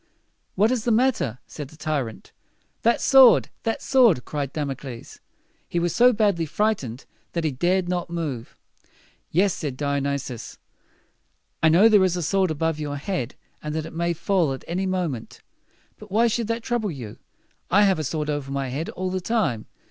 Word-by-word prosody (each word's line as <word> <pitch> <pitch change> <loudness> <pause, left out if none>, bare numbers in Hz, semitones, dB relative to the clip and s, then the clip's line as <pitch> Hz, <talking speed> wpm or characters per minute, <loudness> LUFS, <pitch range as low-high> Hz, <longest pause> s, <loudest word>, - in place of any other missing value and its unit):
"What 210 +5 +3
is 250 -4 0
the 240 - 0
matter?" 225 - +1
said 145 -3 -8
the 155 - -17
tyrant. 140 -8 -3 0.5
"That 235 +1 +3
sword! 265 -3 +7
that 225 - -2
sword!" 235 - +4
cried 145 -3 -3
Damocles. 135 -5 -6 0.5
He - - -3
was 170 -1 +1
so 245 +1 +6
badly 205 -8 +1
frightened 145 - -1 0.3
that 170 - -1
he 155 - +1
dared 175 +7 +1
not 175 -1 -2
move. 150 -9 -5 0.7
"Yes," 190 +3 +2
said 140 -4 -5
Di 140 0 -1
o - - +1
nys 140 -1 -2
i - - -3
us, 115 - -9 1.0
"I 160 - +5
know 180 +7 +6
there 210 -3 +5
is 180 -1 +1
a 175 - -2
sword 190 +3 +1
above 160 0 -1
your 145 -1 -3
head, 140 - -3 0.3
and 150 0 -4
that 160 -1 -2
it - - -9
may 170 +1 0
fall 170 -3 +1
at 135 - -8
any 185 +3 -1
moment. 170 -11 -3 0.6
But 215 - -12
why 225 +4 +3
should 230 -1 0
that 230 0 -2
trouble 235 -4 -1
you? 120 - -7 0.5
I 205 +2 +5
have 190 -4 +3
a - - -1
sword 150 +1 -2
over 145 -2 -3
my 135 -1 -2
head 145 +6 -3
all 185 0 -3
the 185 0 -2
time. 180 - -1
170 Hz, 190 wpm, -24 LUFS, 140-200 Hz, 1.0 s, sword